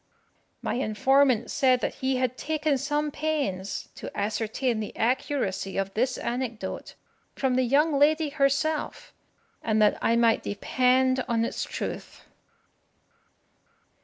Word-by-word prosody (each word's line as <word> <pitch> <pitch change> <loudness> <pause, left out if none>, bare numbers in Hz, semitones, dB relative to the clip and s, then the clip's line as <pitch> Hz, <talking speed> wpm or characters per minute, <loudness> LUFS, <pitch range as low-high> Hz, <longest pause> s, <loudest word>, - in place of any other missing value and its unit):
My - - -1
informant 260 +2 +2
said 255 -2 +3
that - - -1
he 265 0 +1
had 255 -1 0
taken 305 -1 -1
some 295 +2 -1
pains 275 -13 -2
to - - -7
ascertain 220 +3 -1
the 215 - -5
accuracy 225 -6 -1
of 195 0 -2
this 255 +4 0
anecdote 235 -5 -4 0.4
from 265 -2 0
the 255 - +3
young 280 +4 +2
lady 310 +1 +3
herself, 295 - -1 0.5
and 220 -1 +1
that 210 -1 +3
I 230 - +2
might 230 -1 +3
depend 255 +4 +1
on 230 -1 +1
its - - -3
truth. - - -6
255 Hz, 125 wpm, -26 LUFS, 225-280 Hz, 0.5 s, said